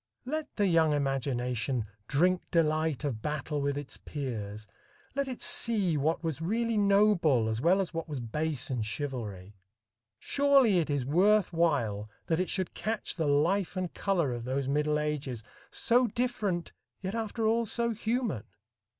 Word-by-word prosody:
Let 310 +4 -4
the 205 - +2
young 165 -4 +4
imagination 125 -4 -1 0.2
"drink 180 +5 +2
delight 155 -3 +1
of 125 -7 -2
battle 150 +1 -2
with 140 0 0
its 145 -2 -6
peers"; 110 -7 -5 0.5
let 280 0 -1
it 255 +4 -3
see 230 - +2
what 155 +4 0
was 160 -2 -2
really 230 +6 0
noble 200 - +4
as 110 +1 -2
well 180 +6 +4
as 190 -2 -2
what 165 -1 -4
was 145 -3 -3
base 135 +3 -2
in 125 -3 -1
chivalry. 110 -6 -5 0.6
Surely 275 - +4
it 160 - -1
is 140 -3 0
worth 185 +6 +3
while 120 -11 +1 0.2
that 160 0 0
it 185 - 0
should 185 -2 -1
catch 220 +3 -3
the 160 -2 -1
life 170 +7 +2
and 185 -2 -2
color 170 -10 0
of 120 -1 -5
those 130 +2 -2
middle 150 +2 +1
ages 145 -6 -3 0.3
so 245 +1 +3
different, 210 -7 -1 0.3
yet 190 +1 -3
after 225 0 -2
all 230 +1 +2
so 235 +2 0
human. 225 - -2
160 Hz, 160 wpm, -30 LUFS, 135-205 Hz, 0.6 s, young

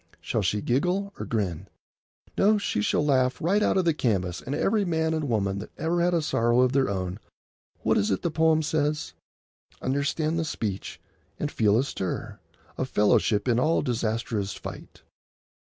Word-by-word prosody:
Shall 100 +7 -1
she 105 +2 0
giggle 180 - 0
or - - -5
grin? 95 -5 -2 0.7
No, 210 +2 +4
she 190 - -1
shall 150 - +1
laugh 130 -3 +2
right 195 +6 +2
out 210 - +2
of 185 - +2
the 165 - +3
canvas, 95 - -1
and 135 - -4
every 210 0 +2
man 160 -3 0
and 155 -3 -2
woman 100 -3 0
that 105 - -8
ever 170 +2 0
had 175 0 +2
a 165 - +1
sorrow 120 -3 +2
of 130 -1 +3
their 135 -3 +2
own 95 0 -3
shall—what - - -4
is 100 - +1
it 95 - -1
the 170 - 0
poem 160 0 +3
says?— 150 0 -1 0.7
"Understand 150 +4 0
the - - 0
speech 105 - -4 0.4
and 150 - -2
feel 105 -1 +3
a 125 - +3
stir 95 -9 -4 0.4
Of 130 - -2
fellowship 105 +1 +2
in 120 -1 +3
all 155 +6 +2
disastrous 110 -3 -2
fight. - - -10
130 Hz, 175 wpm, -26 LUFS, 105-160 Hz, 0.7 s, No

